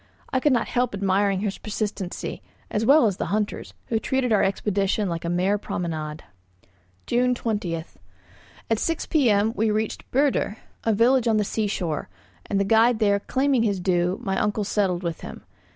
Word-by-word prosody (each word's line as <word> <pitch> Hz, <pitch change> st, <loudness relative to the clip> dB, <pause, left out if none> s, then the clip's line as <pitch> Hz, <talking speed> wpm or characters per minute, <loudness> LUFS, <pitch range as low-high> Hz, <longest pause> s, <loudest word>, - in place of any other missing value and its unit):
I 260 Hz, -, +3 dB
could 295 Hz, +3 st, +2 dB
not 245 Hz, -3 st, +2 dB
help 245 Hz, -3 st, 0 dB
admiring 195 Hz, 0 st, +1 dB
his 205 Hz, -2 st, -3 dB
persistency, 205 Hz, -3 st, -4 dB, 0.3 s
as 215 Hz, +2 st, 0 dB
well 290 Hz, 0 st, +7 dB
as 200 Hz, -4 st, +1 dB
the -, -, -2 dB
hunter's, 210 Hz, +3 st, -2 dB
who 225 Hz, -, +1 dB
treated 250 Hz, 0 st, 0 dB
our 210 Hz, -, +4 dB
expedition 200 Hz, +1 st, 0 dB
like 170 Hz, -2 st, -3 dB
a 170 Hz, -, -2 dB
mere 185 Hz, +4 st, +1 dB
promenade. 155 Hz, -5 st, -4 dB, 0.8 s
June 250 Hz, +1 st, +2 dB
20. 205 Hz, -8 st, -2 dB, 0.9 s
At 225 Hz, -1 st, +1 dB
six 330 Hz, -1 st, -1 dB
p.m. 225 Hz, -7 st, +2 dB
we 220 Hz, -1 st, +1 dB
reached 215 Hz, +1 st, -2 dB
Büdir, 270 Hz, -5 st, +1 dB, 0.3 s
a 225 Hz, -, +2 dB
village 240 Hz, +3 st, +3 dB
on 220 Hz, -1 st, +3 dB
the 210 Hz, -, +2 dB
sea 215 Hz, +1 st, -1 dB
shore; 170 Hz, -, -3 dB, 0.4 s
and 195 Hz, -, 0 dB
the -, -, +3 dB
guide 225 Hz, +3 st, +4 dB
there 205 Hz, -2 st, +2 dB
claiming 265 Hz, +3 st, +1 dB
his 205 Hz, -4 st, +1 dB
due, 180 Hz, 0 st, +1 dB
my 190 Hz, -3 st, -1 dB
uncle 210 Hz, 0 st, 0 dB
settled 195 Hz, -3 st, 0 dB
with 170 Hz, -2 st, -3 dB
him. -, -, -9 dB
210 Hz, 175 wpm, -24 LUFS, 190-230 Hz, 0.9 s, well